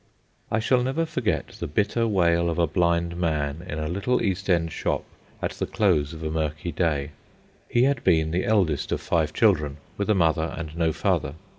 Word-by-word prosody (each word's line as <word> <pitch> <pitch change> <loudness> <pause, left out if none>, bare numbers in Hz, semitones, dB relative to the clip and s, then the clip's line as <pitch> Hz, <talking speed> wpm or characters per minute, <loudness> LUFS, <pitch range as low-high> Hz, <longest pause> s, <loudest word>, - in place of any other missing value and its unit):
I - - +1
shall 125 +3 +2
never 135 +6 0
forget 160 - -1
the - - -6
bitter 105 +8 +1
wail 85 -4 +2
of 85 - -2
a 85 - +4
blind 85 +1 +1
man 80 -2 -1
in 75 - -3
a 75 0 -2
little 100 +9 0
East 95 -2 -2
End 85 -2 +2
shop - - -1 0.4
at - - 0
the - - -4
close 85 -9 +2
of 80 -1 -8
a 80 - -2
murky 80 +1 -2
day. 75 -3 0 0.6
He 120 - +3
had 140 -2 +1
been 80 -3 +3
the 90 +3 0
eldest 95 -10 +1
of - - 0
five 80 -3 0
children, 75 -9 +2 0.2
with 100 +1 -2
a 105 - +4
mother 80 -2 +1
and 80 -2 -6
no 85 -1 +1
father. 80 -5 0
85 Hz, 195 wpm, -25 LUFS, 80-100 Hz, 0.6 s, a